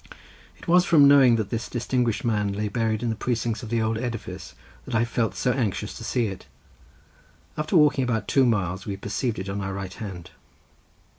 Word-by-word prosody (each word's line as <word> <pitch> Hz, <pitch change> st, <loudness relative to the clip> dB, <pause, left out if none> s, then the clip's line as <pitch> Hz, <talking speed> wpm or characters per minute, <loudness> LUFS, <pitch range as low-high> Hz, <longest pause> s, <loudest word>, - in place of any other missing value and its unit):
It -, -, -15 dB
was 175 Hz, +1 st, +5 dB
from 150 Hz, -5 st, +6 dB
knowing 135 Hz, -4 st, +6 dB
that 110 Hz, -3 st, -2 dB
this 115 Hz, 0 st, -3 dB
distinguished 120 Hz, -2 st, -1 dB
man 105 Hz, -3 st, 0 dB
lay 105 Hz, +1 st, -2 dB
buried 110 Hz, 0 st, -1 dB
in 120 Hz, -, 0 dB
the -, -, -2 dB
precincts 115 Hz, 0 st, -2 dB
of 115 Hz, -, -8 dB
the 115 Hz, -1 st, 0 dB
old 110 Hz, 0 st, -1 dB
edifice 115 Hz, -4 st, -6 dB, 0.3 s
that -, -, -4 dB
I 115 Hz, +1 st, +3 dB
felt 115 Hz, -1 st, -1 dB
so 125 Hz, -, +1 dB
anxious 105 Hz, -5 st, -2 dB
to -, -, -8 dB
see 120 Hz, +1 st, 0 dB
it. 95 Hz, -3 st, -6 dB, 1.1 s
After 155 Hz, +4 st, +1 dB
walking 150 Hz, -3 st, +4 dB
about 115 Hz, -3 st, -1 dB
two 135 Hz, -2 st, +3 dB
miles 95 Hz, -4 st, -1 dB
we 100 Hz, -1 st, -3 dB
perceived 105 Hz, +4 st, -3 dB
it 95 Hz, -, -5 dB
on 100 Hz, +1 st, -3 dB
our 95 Hz, 0 st, -4 dB
right 95 Hz, -2 st, -5 dB
hand. 95 Hz, -6 st, -8 dB
115 Hz, 200 wpm, -25 LUFS, 100-125 Hz, 1.1 s, from